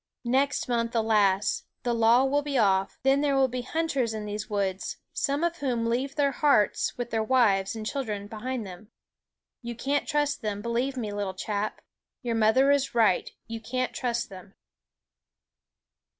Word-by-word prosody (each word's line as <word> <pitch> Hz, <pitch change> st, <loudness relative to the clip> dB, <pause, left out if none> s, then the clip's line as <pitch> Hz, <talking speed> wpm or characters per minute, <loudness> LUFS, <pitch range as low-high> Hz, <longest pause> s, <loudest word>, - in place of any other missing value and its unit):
Next 270 Hz, +4 st, +1 dB
month, 235 Hz, -1 st, -1 dB
alas! 210 Hz, -3 st, +2 dB, 0.2 s
the 240 Hz, -, 0 dB
law 230 Hz, +3 st, +5 dB
will 285 Hz, +2 st, +2 dB
be 285 Hz, -2 st, -2 dB
off; 195 Hz, -3 st, +2 dB
then 270 Hz, +1 st, +4 dB
there 285 Hz, -2 st, +2 dB
will 270 Hz, -1 st, +4 dB
be 250 Hz, 0 st, -4 dB
hunters 265 Hz, -5 st, -1 dB
in 215 Hz, -1 st, -5 dB
these 210 Hz, 0 st, -5 dB
woods, 195 Hz, -2 st, -2 dB, 0.2 s
some 285 Hz, +3 st, 0 dB
of 340 Hz, 0 st, 0 dB
whom 250 Hz, -6 st, -1 dB
leave 255 Hz, +4 st, -1 dB
their 280 Hz, -2 st, +2 dB
hearts, 270 Hz, -7 st, +2 dB
with 245 Hz, -1 st, -4 dB
their 225 Hz, -, +1 dB
wives 220 Hz, -5 st, +2 dB
and 220 Hz, -1 st, -6 dB
children, 215 Hz, -6 st, -3 dB
behind 225 Hz, +3 st, -4 dB
them. 185 Hz, +2 st, -11 dB, 0.7 s
You 235 Hz, -1 st, -6 dB
can't 280 Hz, +5 st, -1 dB
trust 295 Hz, -1 st, 0 dB
them, 210 Hz, -2 st, -3 dB
believe 245 Hz, +3 st, -1 dB
me, 215 Hz, -4 st, -3 dB
little 200 Hz, -2 st, -3 dB
chap. 210 Hz, +2 st, -3 dB, 0.4 s
Your 240 Hz, -1 st, -1 dB
mother 225 Hz, +5 st, +4 dB
is 275 Hz, -3 st, +1 dB
right; 220 Hz, -6 st, +3 dB, 0.2 s
you 230 Hz, 0 st, -6 dB
can't 255 Hz, +3 st, -2 dB
trust 235 Hz, -2 st, -2 dB
them." 190 Hz, 0 st, -12 dB
235 Hz, 165 wpm, -27 LUFS, 210-270 Hz, 0.7 s, law